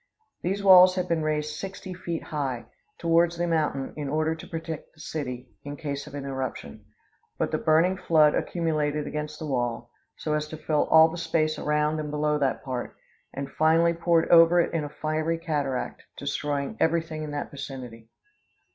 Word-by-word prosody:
These 195 +3 -2
walls 185 -1 +8
had 180 -1 -1
been 170 -2 0
raised 150 -1 -1
sixty 190 0 -6
feet 170 -2 -4
high, 135 -6 -3 0.3
towards 170 0 +2
the 175 - 0
mountain, 155 -5 -1
in 145 -2 -4
order 155 +2 +1
to 160 - -10
protect 160 -1 -6
the - - -22
city, 125 -6 -5
in 145 0 -6
case 140 -2 -4
of - - -9
an 140 -1 -5
eruption. 130 -5 -5 0.5
But - - -1
the - - 0
burning 165 +4 +3
flood 155 -5 +4
accumulated 150 -3 -1
against 150 0 -4
the 155 - -6
wall, 120 -3 -2 0.3
so 155 - -2
as 150 0 -1
to 155 - -8
fill 155 -1 0
all 160 0 +8
the 165 +1 -6
space 160 -2 0
around 150 +1 +1
and 150 -1 -4
below 150 0 0
that 135 -2 0
part, 130 -3 -4 0.4
and 140 0 -5
finally 165 +2 +3
poured 170 -1 +2
over 170 +1 +7
it 170 - +1
in 165 -2 0
a 145 - -5
fiery 155 +2 -1
cataract, 145 -6 -2 0.2
destroying 145 +7 -2
every 165 0 +2
thing 155 -1 -7
in 155 - -4
that 145 - -4
vicinity. 125 -5 -8
155 Hz, 180 wpm, -26 LUFS, 145-165 Hz, 0.5 s, walls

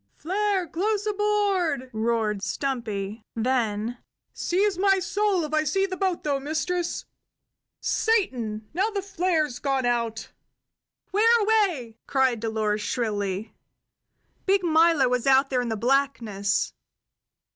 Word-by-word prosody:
"Flare 390 +2 0
close 405 +6 -1
aboard!" 400 -10 0
roared 220 -2 0
Stumpy; 220 -4 -3
then: 230 -1 -1 0.3
"Seize 390 +3 +1
my 390 0 +4
soul 395 -1 0
if 305 0 -5
I 310 0 +3
see 385 +7 +1
the 375 -1 -4
boat, 370 -2 -1
though, 285 -2 0
mistress. 325 +5 -2 0.8
Satan! 240 - 0
Now 385 +6 +1
the 400 -3 -3
flare's 350 -9 0
gone 270 -2 0
out!" 230 -2 -1 0.8
"Whereaway?" 415 - +2
cried 260 -4 +2
Dolores 215 -1 -1
shrilly. 205 -3 -2 0.9
Big 390 0 +3
Milo 325 -4 +4
was 250 +1 0
out 270 +1 +4
there 250 -1 +2
in 245 - -3
the 220 - -2
blackness. 230 -5 0
280 Hz, 115 wpm, -25 LUFS, 230-380 Hz, 0.9 s, my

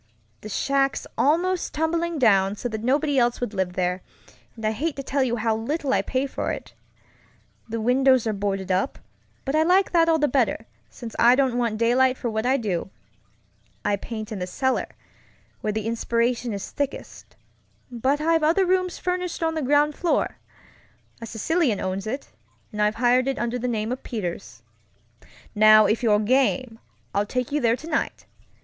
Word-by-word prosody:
The 215 - -8
shack's 275 +5 0
almost 350 +5 +1
tumbling 330 +2 -1
down, 200 -6 +3
so 245 - -4
that 220 -1 -5
nobody 280 +2 +2
else 240 0 +1
would 245 -3 -3
live 190 -2 -1
there, 180 0 -1 0.5
and 225 -2 -7
I'd 215 - +1
hate 300 +7 -2
to 275 - -5
tell 275 +1 -1
you 245 -3 +1
how 225 -1 0
little 270 +5 -2
I - - +3
pay 260 +1 -1
for 275 - -3
it. - - -7 1.0
The 230 +1 -3
windows 255 +2 +3
are 220 - 0
boarded 195 -1 -2
up, 190 +9 0 0.5
but 270 - -2
I 310 - +4
like 365 +4 +3
that 330 -1 +4
all 325 - +4
the 300 -1 +2
better, 245 -4 0 0.2
since 235 -3 -9
I 240 +2 +6
don't 265 -2 +1
want 235 -3 0
daylight 255 +3 +3
for 235 - -3
what 220 +2 -1
I 265 +2 +3
do. 195 -8 -2 1.0
I 205 -1 +2
paint 215 +1 -7
in 210 - -4
the 180 - -3
cellar, 260 +8 -1 0.7
where 215 - -2
the 215 0 -3
inspiration 235 +1 0
is 200 -2 -5
thickest, 285 -1 -5 0.6
but 260 +4 0
I've 325 +1 +2
other 330 +5 +3
rooms 365 -1 0
furnished 360 -2 -3
on 325 0 +1
the 315 - -2
ground 290 +2 +3
floor. 340 +3 0 0.8
A 230 - -6
Sicilian 250 - 0
owns 190 +2 -3
it, 265 +6 -5 0.4
and 210 - -3
I've 210 +1 +2
hired 250 +2 +3
it 270 0 -1
under 240 +1 -2
the 250 - -2
name 220 -1 -2
of 255 - -4
Peters. 170 - -6 0.9
"Now 215 0 +7
if 220 - +1
you're 215 -4 +4
game, 255 +1 +1 0.3
I'll 205 +1 0
take 250 +3 -2
you 295 +1 0
there 230 -1 +3
tonight. 315 +6 -3
245 Hz, 180 wpm, -24 LUFS, 215-285 Hz, 1.0 s, Now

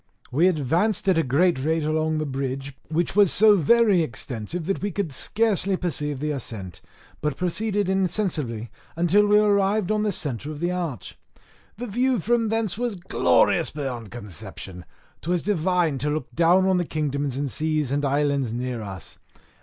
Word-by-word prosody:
We 160 +8 +4
advanced 175 - +1
at 180 -3 +4
a - - +4
great 160 +3 +2
rate 160 +1 +1
along 155 +1 0
the 155 - -1
bridge, 135 0 -4 0.2
which 170 +3 -1
was 205 -4 +5
so 210 0 +6
very 205 +1 +4
extensive 130 +3 -4
that 195 +2 -2
we 205 - -1
could 185 -5 -3
scarcely 200 - +1
perceive 150 -6 -2
the 150 +2 -2
ascent, 105 - -6 0.4
but 150 -2 -2
proceeded 205 +3 -1
insensibly 175 - -1 0.2
until 175 +5 +3
we 210 0 +5
arrived 205 -1 +2
on 215 0 +1
the 210 -1 +1
centre 145 - -3
of 150 -1 -6
the 175 +2 0
arch. 170 -8 -5 0.6
The 245 - -5
view 245 +2 +1
from 230 +3 +1
thence 225 -2 -1
was 240 -3 -1
glorious 85 - +2
beyond 130 -7 -5
conception; 95 -4 -8 0.4
'twas 175 +1 -1
divine 175 -6 +1
to 145 +4 -1
look 155 +1 -3
down 175 +3 +4
on 190 -1 +3
the 175 - 0
kingdoms 145 -4 -2
and 140 -2 -2
seas 155 -2 0
and 145 +1 0
islands 140 -2 +1
under 120 0 -3
us. 95 -3 -7
160 Hz, 170 wpm, -24 LUFS, 140-195 Hz, 0.6 s, so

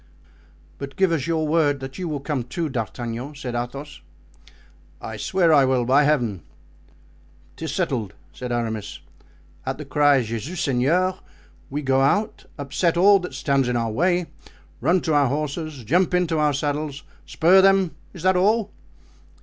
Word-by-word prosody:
"But 140 -1 -7
give 190 +1 +2
us 155 -6 -1
your 160 -2 0
word 150 -3 +2
that 135 +5 -8
you 180 -2 -3
will 145 -3 -3
come 140 -2 -2
too, 160 +6 -3
D'Artagnan," 120 +3 -5
said 130 -4 -6
Athos. 135 - -5 1.0
"I 110 - -7
swear 170 - +2
I 140 -2 +6
will, 130 -2 +1
by 140 +4 +4
Heaven." 120 - +1 1.1
"'Tis 160 - -5
settled," 130 - -2 0.2
said 125 -1 -6
Aramis; 115 -3 -3 0.6
"at 130 0 -3
the 150 - -7
cry 140 -1 +3
'Jesus 115 - -5
Seigneur' 165 +8 +1 0.5
we 145 +2 -4
go 135 0 +2
out, 205 +11 0
upset 160 +4 0
all 200 +3 +6
that 180 - -7
stands 140 -4 +1
in 125 - -1
our 115 -1 -1
way, 175 +8 +1 0.5
run 180 +1 +2
to 160 - -1
our 145 -2 +4
horses, 150 0 -3
jump 180 - +2
into 170 -3 +1
our 150 -1 +2
saddles, 145 0 -3 0.2
spur 185 +4 +5
them; 195 -2 +4 0.2
is 175 -4 -11
that 185 0 +3
all?" 210 +3 +2
145 Hz, 155 wpm, -23 LUFS, 130-170 Hz, 1.1 s, I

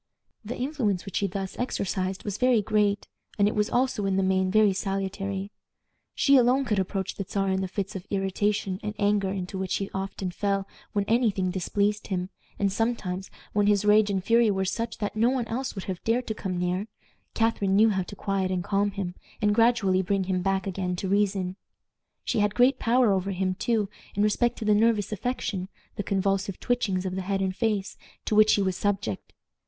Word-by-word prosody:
The 220 +3 -5
influence 245 - -1
which 195 - -4
she 200 - +1
thus 195 0 -5
exercised 190 -5 -2
was 205 -2 -4
very 250 -4 +4
great, 205 -1 +1 0.3
and 205 -1 +4
it 210 - 0
was 210 0 +1
also, 245 -5 +1
in 195 - +1
the 195 - +2
main, 190 0 +2
very 210 0 +4
salutary. 195 0 -3 0.6
She 275 -1 +5
alone 255 +2 +4
could 210 -5 +1
approach 190 0 -2
the 195 - -4
Czar 195 0 -1
in 190 0 +1
the 190 - -1
fits 195 +2 -4
of 185 - -7
irritation 195 0 -1
and 210 0 -4
anger 205 -1 +2
into 190 0 -4
which 190 -1 -1
he 195 - -3
often 190 -1 -3
fell 195 +1 -1 0.3
when 205 -1 +1
any 230 +2 +3
thing 190 -2 -1
displeased 200 +3 -1
him, 185 0 -3 0.3
and 200 -1 +1
sometimes, 200 -5 -2 0.2
when 205 -1 +2
his 205 -1 +3
rage 210 0 +5
and 190 -2 -1
fury 230 +1 +4
were 190 -1 0
such, 230 +4 -3
that 205 0 -3
no 225 +3 +3
one 255 -2 0
else 250 +3 -3
would 195 - -5
have 185 -2 -5
dared 240 +2 +1
to 220 - -2
come 190 -4 -4
near, 180 +3 -1 0.5
Catharine 225 -4 +1
knew 220 +2 +6
how 190 -2 0
to 185 +3 -7
quiet 195 -2 -1
and 185 -1 -1
calm 205 +2 +1
him, 195 -3 -4 0.3
and 210 -2 +2
gradually 225 -5 +3
bring 195 +1 0
him 185 -1 -1
back 195 +1 0
again 185 -2 -2
to 185 +1 -3
reason. 195 -2 +1 0.7
She - - 0
had 205 0 +1
great 250 +3 +4
power 240 -1 +3
over 190 0 -1
him, 185 -1 0
too, 210 +1 0 0.3
in 205 - +2
respect 235 +3 +2
to 220 - -5
the 210 - +4
nervous 215 -1 +2
affection 205 -4 -3 0.3
the 205 - -2
convulsive 195 -1 -1
twitchings 205 -7 0
of 185 - -2
the 190 - -2
head 195 +1 -1
and 190 -1 -1
face 210 -3 -1 0.3
to - - -1
which 215 0 +6
he 200 - +1
was 190 -1 0
subject. 195 - -2
200 Hz, 205 wpm, -27 LUFS, 190-215 Hz, 0.7 s, knew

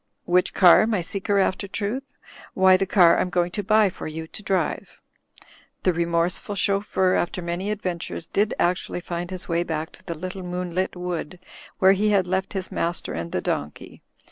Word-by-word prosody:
Which 180 +1 +2
car, 185 +3 +7
my 215 -5 0
seeker 195 +3 -1
after 195 0 +1
truth? 225 +8 -4 0.4
Why 190 0 +6
the 195 +1 0
car 175 -3 +5
I'm 180 - 0
going 175 -1 0
to 205 - -2
buy 215 -1 +4
for - - -7
you 160 +1 -6
to 185 - -10
drive." 195 -2 -2 0.8
The 185 - +3
remorseful 170 +4 -1
chauffeur, 195 -1 +1
after 175 0 -1
many 175 +3 -3
adventures, 180 -5 -4
did 205 +5 0
actually 175 0 0
find 175 0 -5
his 185 -1 -3
way 170 0 +1
back 160 -2 -3
to - - -17
the 170 - -5
little 185 +3 -6
moonlit 180 +1 -3
wood 180 -1 -4 0.4
where 190 0 +6
he 210 +2 +1
had 200 -3 +3
left 190 +1 -2
his 190 -2 -4
master 170 +1 -2
and 85 0 -5
the - - -1
donkey. 75 0 -4
180 Hz, 180 wpm, -24 LUFS, 175-195 Hz, 0.8 s, car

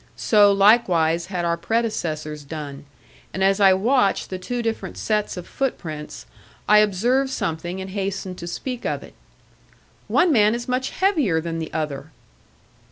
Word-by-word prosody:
So 205 -2 +5
likewise 180 -5 +3
had 180 -3 -3
our 170 0 0
predecessors 160 -9 -2
done; 145 -1 -7 0.5
and 190 - 0
as 195 +1 +3
I 195 -2 +6
watched 225 +1 +1
the 185 - -4
two 240 +5 -3
different 225 -1 -4
sets 210 -3 -1
of 180 - -6
footprints, 155 - -5 0.4
I 210 0 +7
observed 235 +7 +2
something 175 -6 -3
and 190 0 -6
hastened 190 -2 -4
to 170 - -7
speak 245 +8 -5
of - - -2
it. - - -14 0.9
"One 355 - +3
man 215 -4 +4
is 240 0 -6
much 255 +1 -1
heavier 305 - +1
than 165 0 -4
the 160 - -5
other." 150 -2 -4
190 Hz, 155 wpm, -22 LUFS, 165-230 Hz, 0.9 s, I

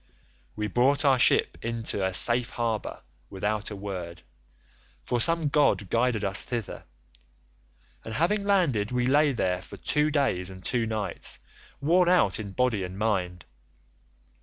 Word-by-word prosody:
We 105 - -3
brought 130 +8 +2
our 135 -2 +4
ship - - +3
into 115 -3 -2
a 95 - 0
safe 120 +5 +1
harbour 115 -3 -3 0.3
without 105 +2 -2
a 105 - -6
word, 90 -4 -7 0.8
for 120 -1 0
some 165 0 +3
god 140 -9 +2
guided 115 -3 +1
us 95 +1 0
thither, 120 -5 -5 1.2
and 110 - -6
having 200 +7 +1
landed 165 - +1
we 125 0 0
lay 145 +3 +4
there 90 -7 -1
for 100 - -11
two 150 +9 0
days 135 -12 0
and 95 -1 -11
two 120 -3 0
nights, 110 -2 -4 0.4
worn 175 +5 +3
out 115 - +3
in 100 -2 -6
body 120 -4 0
and 90 +1 -7
mind. 90 -5 -1
115 Hz, 145 wpm, -27 LUFS, 100-140 Hz, 1.2 s, our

